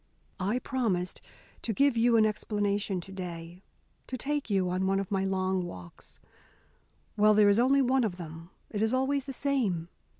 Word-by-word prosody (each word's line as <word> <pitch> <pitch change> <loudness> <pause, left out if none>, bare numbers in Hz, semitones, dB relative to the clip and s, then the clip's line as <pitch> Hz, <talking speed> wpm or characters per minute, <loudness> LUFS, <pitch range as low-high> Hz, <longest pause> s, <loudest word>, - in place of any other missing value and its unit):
"I 200 +6 0
promised 225 -9 -1 0.4
to 225 - -2
give 280 +3 +3
you 230 0 +4
an 220 - +5
explanation 205 -2 -1
to 190 - -12
day 175 -2 -7 0.5
to 255 - -4
take 290 +1 -2
you 190 -3 +2
on 185 +1 0
one 195 0 +2
of 195 0 -4
my 195 -1 +1
long 190 -1 0
walks. 90 - -10 1.0
Well, 215 0 +5
there 210 -1 +6
is 200 +2 +4
only 270 +3 +4
one 260 0 +2
of 195 -5 -2
them. 165 0 -9 0.2
It 210 - -2
is 220 +3 +2
always 270 +1 0
the 275 - -5
same. 230 - 0
205 Hz, 175 wpm, -29 LUFS, 185-245 Hz, 1.0 s, there